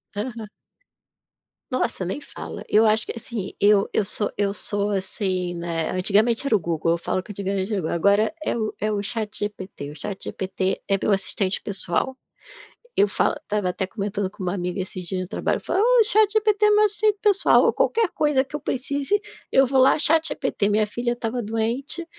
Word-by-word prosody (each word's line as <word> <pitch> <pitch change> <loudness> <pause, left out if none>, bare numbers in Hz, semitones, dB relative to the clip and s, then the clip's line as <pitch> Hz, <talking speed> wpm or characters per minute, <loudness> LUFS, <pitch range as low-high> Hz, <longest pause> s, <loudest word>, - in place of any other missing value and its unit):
Aham. 220 +1 -5 1.2
Nossa, 255 -6 -1
nem 185 +10 -3
fala. - - -9
Eu 215 +2 +4
acho 215 0 +3
que - - -5
assim, 230 -3 -6
eu 205 -1 +4
eu - - +2
sou 205 +1 -2
eu 200 -1 +1
sou, 205 0 -2
assim, 185 -2 -2
né, 170 -1 -2
antigamente 215 +7 +2
era 275 - +1
o 215 - +5
Google, 165 -1 -1
eu 170 - +2
falo 180 +2 -2
que 210 - -10
antigamente 195 0 -3
era 205 - 0
o - - -2
Google, 160 - -2
agora 200 - +3
é - - -1
o 215 -2 -2
é 215 +1 -1
o 205 -1 -1
ChatGPT, 205 -7 -4
o - - -11
ChatGPT 190 +1 -3
é 195 - +2
meu 210 - +2
assistente 195 0 -1
pessoal, 205 +6 -2 0.8
eu 205 - +5
falo. 205 - +1
Estava 205 -3 -1
até 185 +1 -2
comentando 200 -1 -3
com 190 - -9
uma 180 0 -1
amiga 180 0 -3
esses 185 -1 -6
dias 185 0 -2
no 185 - -5
trabalho, - - -1
eu - - -20
falo: 385 - 0
"Oh, 485 +1 +5
ChatGPT 425 0 +3
é - - +6
meu 420 0 +5
assistente 425 0 +2
pessoal", 405 -2 +4
ou - - +4
qualquer 460 -4 +1
coisa 295 -5 +1
que 295 +2 -6
eu - - -12
precise, 280 +6 -1 0.3
eu 270 - +5
vou 265 +1 +2
lá, 260 - +5
ChatGPT. 315 -9 +2
Minha 210 +1 +2
filha 240 +3 -2
estava 240 0 -3
doente, 235 +9 -1
210 Hz, 195 wpm, -23 LUFS, 190-265 Hz, 1.2 s, é